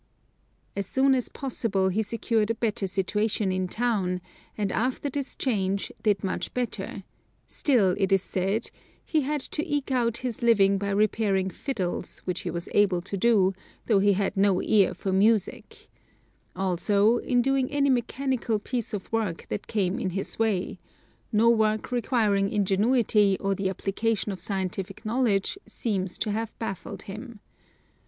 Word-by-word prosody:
As 200 -2 -3
soon 270 +3 +3
as 255 -2 0
possible 220 -8 -1
he 200 +4 0
secured 220 0 0
a 230 - +1
better 215 -3 -1
situation 200 +2 0
in 185 0 -1
town, 200 -5 0 0.4
and 205 -2 -1
after 260 +4 -1
this 280 0 -3
change 200 -6 -1
did 205 -4 +1
much 190 - -3
better, 215 -5 -3 0.4
still 225 -10 +2
it 195 -1 +1
is 195 -1 +4
said: 195 +4 -1 0.3
"He 315 - +1
had 290 +1 -1
to 300 - -2
eke 290 -3 -2
out 235 -3 +1
his 240 -4 -3
living 200 -4 +4
by 200 0 -2
repairing 200 -2 +1
fiddles, 195 -10 -3
which 180 -1 -2
he - - -4
was 170 0 -4
able 190 -4 +3
to 200 - -4
do, 195 -2 +3 0.3
though 210 -4 +4
he 200 +1 +4
had 195 +1 -1
no 195 -1 +3
ear 200 -4 +3
for 190 - -2
music," 210 +1 +1 0.7
also, 200 +4 +2
in 245 0 +1
doing 270 0 +1
any 280 -1 +2
mechanical 250 -1 0
piece 230 0 -3
of 195 - -7
work 215 -7 -1
that 105 - -4
came 195 -3 0
in - - -1
his 195 +4 -4
way; 210 -5 0 0.5
no 220 +1 +4
work 220 -1 +2
requiring 220 -5 +1
ingenuity 205 0 +3
or 195 0 0
the 195 0 -1
application 205 +3 -1
of 190 -3 -6
scientific 190 +1 -4
knowledge 230 - +1
seems 190 -5 -2
to 215 - -1
have 225 +1 -3
baffled 195 -5 -5
him. 220 +3 -8
210 Hz, 155 wpm, -26 LUFS, 195-235 Hz, 0.7 s, is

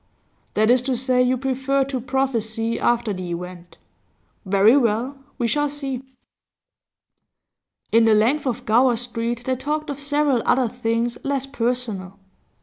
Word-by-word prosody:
'That 215 +2 +4
is 250 0 +4
to 255 -1 -1
say, 255 0 +2
you 250 +1 +2
prefer 270 +1 0
to 265 -2 -4
prophesy 230 -3 -1
after 235 -3 +1
the 185 -2 -6
event. 175 0 -7 0.7
Very 200 +5 +5
well, 245 +1 +1 0.2
we 240 - 0
shall 295 +4 +1
see.' 275 -3 -5 1.9
In 230 0 +5
the 220 -1 +5
length 255 +8 +2
of 245 - -3
Gower 240 +3 +4
Street 235 0 -3
they 260 - 0
talked 300 +3 -3
of 285 - -6
several 290 -3 +1
other 255 -1 +2
things 235 0 -2
less 275 -1 -1
personal. 230 -7 -3
245 Hz, 145 wpm, -22 LUFS, 225-270 Hz, 1.9 s, Very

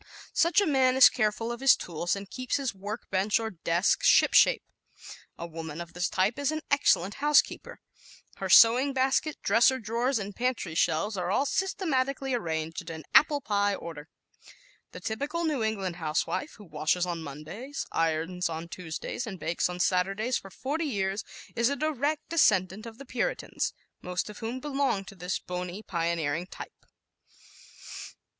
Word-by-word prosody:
Such 340 +4 +4
a 405 - +3
man 265 -4 +3
is 265 - +9
careful 225 0 -1
of 235 - -5
his 270 -1 +6
tools 170 +1 -2
and 200 0 -7
keeps 255 +4 -3
his 275 -5 -1
work 205 +4 -7
bench 195 +3 +2
or 225 -1 -3
desk 170 +1 +1
"shipshape." - - +5 0.7
A 170 - -5
woman 165 -1 -7
of 170 0 -8
this 180 +1 -1
type 195 +8 0
is 285 +1 +1
an 310 0 -3
excellent 205 -9 +3
housekeeper. 295 0 +2 0.6
Her - - -4
sewing 250 +5 +7
basket, 270 +3 +1
dresser 235 +5 +4
drawers 235 +3 -1
and 200 -1 -5
pantry 245 -9 -2
shelves 180 +6 +1
are 180 -1 -2
all 265 +8 +2
systematically 275 -7 -1
arranged 165 -4 -3
in 160 -1 -7
apple 295 -1 +5
pie 205 -3 +1
order. 160 -4 -9 0.8
The - - -9
typical 285 +10 -3
New 300 -6 0
England 195 -5 -2
housewife, 160 - -2
who 205 - -14
washes 155 +2 0
on 170 -2 -4
Mondays, 160 - -7
irons 165 +2 0
on 165 +1 -6
Tuesdays 180 +8 -5
and 190 -4 -6
bakes 170 +2 -1
on 180 0 -6
Saturdays 195 +7 +1
for 195 - -4
forty 290 - -3
years, 200 -6 -1 0.3
is 235 +2 +2
a 280 - -1
direct 300 0 -1
descendant 210 - +2
of 225 -1 -10
the 275 - -10
Puritans, 250 - -2 0.3
most 180 +3 -3
of 210 - -12
whom 230 +3 -4
belong 270 -8 -1
to - - -10
this 180 0 -3
bony, 180 +3 -6
pioneering 170 -2 -1
type. - - -11
205 Hz, 160 wpm, -28 LUFS, 175-260 Hz, 0.8 s, is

